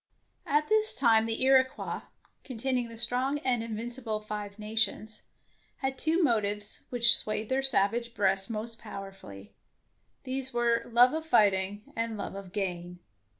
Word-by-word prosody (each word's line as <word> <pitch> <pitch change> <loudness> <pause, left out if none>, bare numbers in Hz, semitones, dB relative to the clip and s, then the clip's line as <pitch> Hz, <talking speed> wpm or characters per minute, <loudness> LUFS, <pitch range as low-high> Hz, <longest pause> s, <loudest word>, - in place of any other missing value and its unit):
'^ - - -6
At 295 +1 +2
this 435 0 +4
time 225 -3 +4
the 225 +2 -1
Iroquois, 260 0 +2 0.4
containing 250 -1 -2
the 230 - -11
strong 250 +4 0
and 245 -3 +3
invincible 230 0 -4
Five 210 -1 -7
Nations, 215 0 -2 0.6
had 265 0 -3
two 330 +3 +1
motives 210 -5 0
which 235 -1 +6
swayed 215 0 -2
their 260 +1 +1
savage 235 -2 +1
breasts 195 0 0
most 225 +1 -5
powerfully; 100 - -10 0.7
these 265 0 -4
were 235 -1 0
love 245 +3 +5
of 320 0 -4
fighting 205 - +1
and 230 -1 -3
love - - -5
of 195 -2 -9
gain. 180 -3 -4
230 Hz, 145 wpm, -28 LUFS, 205-255 Hz, 0.7 s, which